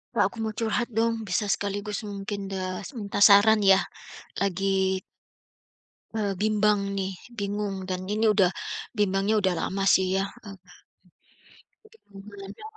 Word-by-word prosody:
Kak - - +4
aku - - -14
mau 220 -1 -2
curhat 230 +1 0
dong 230 0 +1
bisa 190 +3 0
sekaligus 205 +1 -2
mungkin 200 0 -5
das 190 +6 -5
minta 205 -3 -4
saran 205 +2 +7
ya? 195 -1 +5 0.6
Lagi 190 0 +1 1.2
eee, 205 -3 0
bimbang 210 -1 +3 0.2
nih 190 0 -2 0.3
bingung 205 0 -2
dan 185 0 -2
ini 220 +2 +1
udah 190 -4 +4 0.5
bimbangnya 200 +1 +1
udah 190 -2 +2
lama 195 +1 -2
sih 190 -1 +4
ya. 195 - +1 1.9
Hubungannya, 200 - -11
200 Hz, 120 wpm, -26 LUFS, 195-210 Hz, 1.9 s, saran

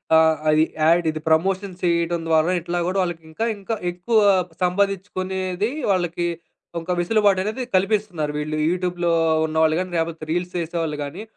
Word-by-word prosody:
ఆహ్, 160 0 +5
అది 155 +1 +5 0.2
యాడ్ 170 +1 +4
ఇది 155 - -6
ప్రమోషన్ 190 +4 +1
చేయడం 170 0 +1
ద్వారా 160 +2 +3
ఇట్లా 175 +1 -2
గూడా 190 +1 0
వాళ్ళకి 175 -2 -4
ఇంకా, 225 +8 -2
ఇంకా 210 +3 -3 0.2
ఎక్కువ 200 +6 0 0.5
సంపాదిచ్చుకునేది 190 +1 -1 0.2
వాళ్ళకి 175 -1 -1 0.5
ఒక 170 +2 -2
వెసులుబాటనేది 205 +4 +1
కల్పిస్తున్నారు 185 -6 0
వీళ్ళు. 155 +1 -3
యూట్యూబ్‌లో 175 -1 -1 0.3
ఉన్నవాళ్ళు 160 0 +2
గానీ, 185 0 -3
లేపోతే 165 -1 -2
రీల్స్ 175 +1 -1
చేసేవాళ్ళు 165 -2 -2
గానీ, 145 +8 -7
175 Hz, 135 wpm, -22 LUFS, 165-190 Hz, 0.5 s, ఆహ్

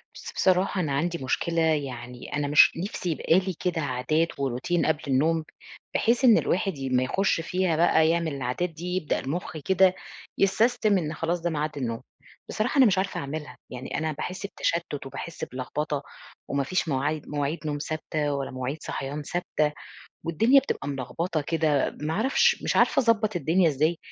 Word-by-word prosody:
بس - - -9
بصراحة 185 +1 +2
أنا 155 -5 -2
عندي 170 +5 0
مشكلة 165 +5 0
يعني 130 -6 -2
أنا 145 0 0
مش 150 +1 +7
نفسي 180 0 -3
يبقى 165 +2 +3
لي 190 0 -3
كده 175 -3 -1
عادات 145 +5 0
وروتين 140 +6 0
قبل 160 -1 +1
النوم. 155 +5 +2 0.5
بحيث 235 +3 +2
إن 235 -3 +8
الواحد 190 -2 0
ي 135 -1 -4
أمّا 130 -1 +2
يخُش 190 +6 +1
فيها 180 0 0
بقي 160 -1 +4
يعمل 165 -2 0
العادات 135 +7 -2
دي، 175 +3 -5
يبدأ 180 -5 0
المُخ 160 +4 -4
كده 185 +4 +3 0.4
يسستم 215 +1 +3
إن 155 -3 -2
خلاص، 170 +2 -2
ده 175 - 0
ميعاد 150 -2 -2
النوم. 115 -2 -3 0.5
بصراحة 235 +6 -1
أنا 265 - +8
مش 195 -4 +3
عارفة 195 +1 -1
أعملها، 140 -2 -6
يعني 125 0 -5
أنا 160 0 -1
باحس 180 +6 -5
بتشتُّت 170 -7 -2
وباحس 155 +4 -7
بلغبطة 140 +3 -3 0.4
وما 140 0 0
فيش 180 +6 -1
موعي 145 +2 0
مواعيد 145 +2 -2
نوم 145 -1 -1
ثابتة 155 -1 -2
ولا 140 -1 -3
مواعيد 130 +3 -3
صحيان 140 +2 -4
ثابتة، 155 -2 -1 0.5
والدنيا 225 - +5
بتبقي 265 - -4
ملغبطة 145 +5 -2
كده، 150 -2 0
ما 155 +2 -1
أعرفش 270 - +2
مش - - 0
عارفة - - +4
أضبّط 220 -4 +2
الدنيا 170 +2 +3
إزاي؟ 155 +4 +1
160 Hz, 170 wpm, -26 LUFS, 140-180 Hz, 0.5 s, إن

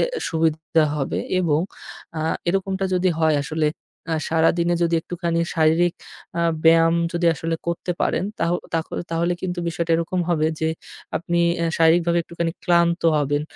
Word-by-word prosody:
এ - - +4 0.2
সুবিধা 160 -1 +1
হবে 135 -2 -2 0.2
এবং 155 -4 +2 0.6
আ - - -2 0.3
এরকমটা 195 +1 0
যদি 185 +1 +2
হয় 160 -2 +3
আসলে 155 0 0 0.4
আ - - +2
সারাদিনে 170 +2 +2
যদি 170 0 +2
একটুখানি 170 0 -2
শারীরিক 165 +2 +3 0.4
আ - - +2 0.2
ব্যায়াম 165 0 +6 0.2
যদি 170 0 0
আসলে 165 +1 -2
করতে 170 +1 -2
পারেন - - 0 0.2
তাহও 170 +1 +2 0.2
তাখ 165 0 0 0.2
তাহলে 170 +1 +1
কিন্তু 180 -1 -3
বিষয়টা 170 0 -3
এরকম 170 +2 -1
হবে 155 -2 +2
যে, 160 - +1 0.5
আপনি 170 +1 -1 0.2
এ্যা 170 0 0
শারীরিকভাবে 170 +1 +4
একটুখানি 170 0 -3
ক্লান্ত 170 -1 +3
হবেন। 145 0 0
165 Hz, 150 wpm, -22 LUFS, 160-175 Hz, 0.6 s, ব্যায়াম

